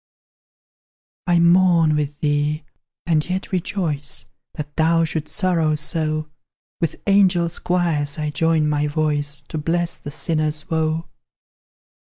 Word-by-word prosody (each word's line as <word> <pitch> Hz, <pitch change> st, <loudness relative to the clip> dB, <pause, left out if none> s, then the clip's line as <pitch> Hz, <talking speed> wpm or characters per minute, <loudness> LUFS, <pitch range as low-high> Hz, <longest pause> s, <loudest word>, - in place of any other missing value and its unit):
I 175 Hz, -1 st, +4 dB
mourn 170 Hz, -2 st, +5 dB
with 150 Hz, -1 st, -2 dB
thee, 150 Hz, +1 st, 0 dB, 0.4 s
and 160 Hz, -3 st, +2 dB
yet 185 Hz, +1 st, -3 dB
rejoice 165 Hz, -6 st, -2 dB, 0.3 s
That 150 Hz, -2 st, -6 dB
thou 165 Hz, +1 st, +3 dB
shouldst 155 Hz, -1 st, -4 dB
sorrow 170 Hz, -6 st, +2 dB
so; 155 Hz, 0 st, -1 dB, 0.5 s
With 165 Hz, -2 st, -3 dB
angel 190 Hz, -4 st, +4 dB, 0.2 s
choirs 165 Hz, -5 st, 0 dB
I 150 Hz, -1 st, -2 dB
join 160 Hz, +1 st, +2 dB
my 150 Hz, 0 st, +1 dB
voice 145 Hz, -1 st, 0 dB
To 155 Hz, -, -3 dB
bless 170 Hz, +2 st, -1 dB
the -, -, -7 dB
sinner's 155 Hz, +2 st, -2 dB
woe. 160 Hz, 0 st, 0 dB
155 Hz, 120 wpm, -21 LUFS, 150-170 Hz, 0.5 s, mourn